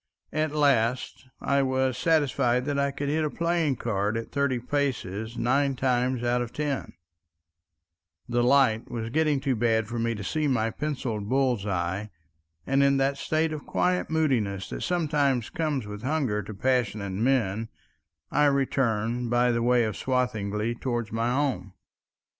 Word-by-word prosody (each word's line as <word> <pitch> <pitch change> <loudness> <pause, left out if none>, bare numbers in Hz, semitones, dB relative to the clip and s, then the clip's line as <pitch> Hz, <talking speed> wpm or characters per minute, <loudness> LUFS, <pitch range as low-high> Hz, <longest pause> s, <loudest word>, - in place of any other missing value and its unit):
At 155 0 0
last 130 -4 +1
I 140 0 +2
was 130 -1 +1
satisfied 130 -5 +2
that 145 -1 -1
I 140 0 +2
could 140 +1 -4
hit 155 +2 +1
a 150 - 0
playing 170 -3 0
card 110 -2 -1
at 115 - -6
thirty 140 -3 +1
paces 120 -5 -2
nine 135 +3 +1
times 125 -1 0
out 120 0 +1
of 120 -1 -4
ten; 145 -1 -3 1.3
the 120 0 +1
light 125 -3 +3
was 115 -1 -4
getting 150 -1 +2
too 135 -1 0
bad 110 -1 +1
for 120 +1 -4
me 115 0 0
to 100 - -6
see 155 +9 -1
my 115 -4 +1
penciled 125 -9 -3
bull's 125 -6 +1
eye, 95 +2 -2 0.6
and 135 +1 +2
in 140 0 +4
that 135 +1 +1
state 155 +1 0
of 150 - -7
quiet 180 0 0
moodiness 115 -12 0
that - - -5
sometimes 145 -8 0
comes 150 -8 -1
with 105 0 -7
hunger 130 -6 0
to 105 +2 -8
passionate 110 -4 0
men, 110 0 0 0.6
I 150 +1 +3
returned 125 -4 +1
by 120 +1 +3
the 115 0 0
way 120 0 +3
of 110 -3 -2
Swathinglea 110 -1 -1
towards 120 -4 -2
my 115 +2 0
home. 125 -9 -1
125 Hz, 160 wpm, -27 LUFS, 115-140 Hz, 1.3 s, in